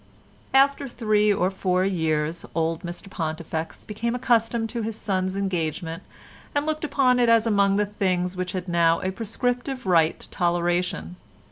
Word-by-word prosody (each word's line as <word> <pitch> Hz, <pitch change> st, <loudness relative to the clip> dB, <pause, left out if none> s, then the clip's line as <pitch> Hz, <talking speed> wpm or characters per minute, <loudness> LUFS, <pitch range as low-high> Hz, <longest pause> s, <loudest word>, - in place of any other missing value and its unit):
After 275 Hz, +1 st, +4 dB
three 215 Hz, -4 st, +2 dB
or 195 Hz, -2 st, +1 dB
four 185 Hz, -1 st, +1 dB
years, 160 Hz, -3 st, 0 dB
old 165 Hz, 0 st, 0 dB
Mr 175 Hz, +2 st, -7 dB
Pontifex 160 Hz, -2 st, -4 dB
became 230 Hz, +3 st, -2 dB
accustomed 230 Hz, -2 st, +1 dB
to 235 Hz, +1 st, -3 dB
his 220 Hz, 0 st, -3 dB
son's 190 Hz, -3 st, -1 dB
engagement 165 Hz, -3 st, -2 dB, 0.5 s
and 290 Hz, 0 st, +1 dB
looked 310 Hz, 0 st, -2 dB
upon 260 Hz, -4 st, +3 dB
it 240 Hz, -1 st, +4 dB
as 230 Hz, -1 st, +5 dB
among 200 Hz, -3 st, +3 dB
the 205 Hz, +1 st, +2 dB
things 185 Hz, -3 st, -1 dB
which 185 Hz, 0 st, -3 dB
had 185 Hz, -1 st, -4 dB
now 170 Hz, -1 st, +3 dB
a 185 Hz, -, -1 dB
prescriptive 245 Hz, +5 st, -2 dB
right 165 Hz, -4 st, +3 dB
to -, -, -12 dB
toleration. 175 Hz, -, 0 dB
190 Hz, 155 wpm, -24 LUFS, 170-230 Hz, 0.5 s, as